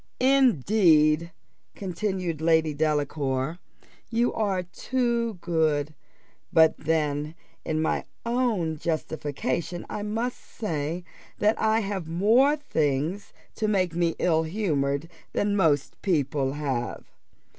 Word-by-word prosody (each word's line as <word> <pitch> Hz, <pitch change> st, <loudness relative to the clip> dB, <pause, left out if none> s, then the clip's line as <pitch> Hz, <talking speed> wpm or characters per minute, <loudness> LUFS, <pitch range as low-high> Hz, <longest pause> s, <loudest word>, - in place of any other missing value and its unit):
"Indeed," 175 Hz, -, +4 dB, 0.4 s
continued 185 Hz, -4 st, -3 dB
Lady 160 Hz, -1 st, +3 dB
Delacour, 145 Hz, 0 st, -1 dB, 0.5 s
"you 235 Hz, +1 st, +1 dB
are 195 Hz, -4 st, 0 dB
too 235 Hz, +4 st, -1 dB
good; 155 Hz, -3 st, +1 dB, 0.6 s
but 160 Hz, -1 st, +5 dB
then 150 Hz, -1 st, -1 dB, 0.3 s
in 155 Hz, 0 st, -1 dB
my -, -, 0 dB, 0.2 s
own 225 Hz, -10 st, 0 dB
justification 160 Hz, +1 st, -3 dB
I 210 Hz, -, -3 dB
must 225 Hz, +4 st, -2 dB
say, 165 Hz, -4 st, -4 dB, 0.3 s
that 210 Hz, +1 st, +2 dB
I 220 Hz, +1 st, +3 dB
have 195 Hz, -5 st, -3 dB
more 225 Hz, -, +4 dB
things 160 Hz, -, -1 dB, 0.2 s
to 215 Hz, -, -1 dB
make 185 Hz, -5 st, +1 dB
me 170 Hz, -1 st, +1 dB
ill 160 Hz, -2 st, +2 dB
humoured 155 Hz, -5 st, -1 dB, 0.3 s
than 205 Hz, 0 st, +1 dB
most 155 Hz, -8 st, +1 dB
people 140 Hz, -6 st, 0 dB
have. 135 Hz, -5 st, -3 dB
165 Hz, 105 wpm, -26 LUFS, 150-210 Hz, 0.6 s, but